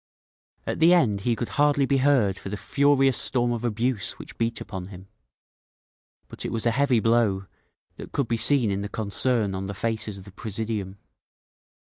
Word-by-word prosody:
At - - -3
the 170 +3 +6
end 105 - +2
he 120 +2 +1
could 120 - -4
hardly 145 -1 +3
be 135 +1 +2
heard 130 -8 +3
for - - -7
the 105 - -4
furious 135 +1 +2
storm 120 -2 +1
of 120 -1 -3
abuse 120 -1 -1
which - - -12
beat 115 -1 -1
upon 95 -4 -6
him. 95 0 -12 1.2
But - - -5
it - - -3
was 115 0 -2
a 120 - +3
heavy 130 0 +2
blow—that 110 -4 -2
could 140 -4 -1
be 115 - 0
seen 120 -2 +3
in 100 0 -2
the 100 - -5
concern 110 0 0
on 95 0 -4
the 100 - -5
faces 110 -1 -2
of 95 - -10
the 100 - -12
presidium. 105 -1 -4
115 Hz, 180 wpm, -25 LUFS, 100-130 Hz, 1.2 s, the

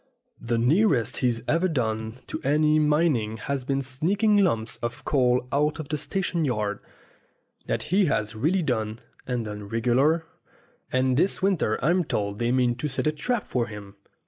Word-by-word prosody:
The 115 0 -1
nearest 135 - +2
he's 120 -2 0
ever 170 +4 +2
done 110 -5 -2
to - - -5
any 150 +2 +3
mining 150 -8 +2
has 135 +4 -3
been 135 +1 -1
sneaking 195 +11 +1
lumps 115 - +1
of 120 +3 -5
coal 125 -2 +2
out 150 +2 +1
of 155 -3 -7
the 150 - -1
station 170 +2 -1
yard. 105 -7 -1 0.9
That - - -1
he 195 0 +5
has 105 -7 0
really 165 - +1
done, 110 -5 -1 0.3
and 125 -3 -2
done 105 -1 -6
regular, 130 +9 +2 0.7
and 130 0 +2
this 185 +4 +1
winter 180 - +1
I'm 175 +3 +3
told 100 -8 -2
they 120 0 +1
mean 125 -1 +2
to 150 - -2
set 140 +1 -2
a 155 - +3
trap 225 +9 -2
for 120 -2 -1
him. 105 -2 -10
130 Hz, 170 wpm, -25 LUFS, 115-155 Hz, 0.9 s, he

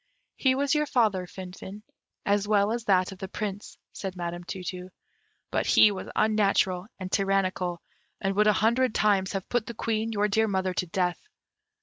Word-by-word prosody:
"He 260 -1 +2
was 280 +1 +1
your 300 -1 +1
father, 210 -9 +1
Finfin, 190 +3 -9 0.4
as 205 0 +1
well 205 0 +3
as 235 0 -3
that 185 -2 +3
of 190 - -11
the 190 - -5
Prince," 205 0 -5 0.2
said 190 -2 -5
Madam 175 0 -4
Tu 185 +1 -6
tu; 180 +1 -6 0.6
"but - - 0
he 210 - +6
was 195 - -6
unnatural 200 -3 +2
and 185 -1 -6
tyrannical, 185 -3 0 0.4
and 195 -1 -1
would 210 +1 +4
a 210 - +6
hundred 235 +4 +2
times 200 -2 +2
have 195 -1 -4
put 240 -3 -1
the 235 - -6
Queen, 225 0 -1
your 210 -1 +1
dear 220 +2 +2
mother, 190 -2 0
to 180 - -2
death. 180 +1 -1
195 Hz, 185 wpm, -27 LUFS, 185-215 Hz, 0.6 s, he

